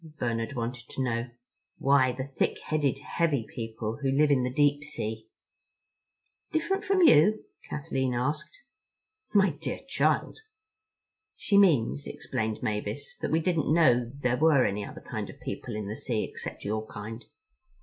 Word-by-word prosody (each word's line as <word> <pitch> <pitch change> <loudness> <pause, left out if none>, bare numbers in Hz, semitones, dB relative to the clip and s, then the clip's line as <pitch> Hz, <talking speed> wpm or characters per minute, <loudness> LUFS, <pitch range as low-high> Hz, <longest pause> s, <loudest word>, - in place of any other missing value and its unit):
Bernard 115 0 -2
wanted 120 -1 -4
to 135 - -2
know. 120 -1 -1 0.5
"Why, 135 -2 +4
the 130 +1 -4
thick 135 0 -1
headed, 145 -4 0
heavy 145 -4 0
people 115 0 -5
who 135 - +1
live 145 +2 +3
in 135 -2 +4
the 125 0 -1
deep 145 +2 +2
sea." 110 -6 -4 1.2
"Different 385 +5 0
from 390 -3 +3
you?" 215 - +6 0.2
Kathleen 130 -3 -1
asked. 150 +6 -3 0.7
"My 195 -3 +5
dear 145 +3 -4
child!" - - +1 1.0
"She 205 - 0
means," 140 - +4
explained 110 +1 -3
Mavis, 110 +4 -3
"that - - -3
we 160 +1 +2
didn't 165 -3 +1
know 125 -8 +4
there 125 -1 +1
were 150 -4 +5
any 100 +1 -1
other - - -9
kind - - -5
of - - -11
people 120 - -5
in 105 -2 -4
the 105 - -4
sea 115 -2 -2
except - - -7
your 110 +1 -2
kind." 110 +2 -7
130 Hz, 150 wpm, -28 LUFS, 115-155 Hz, 1.2 s, you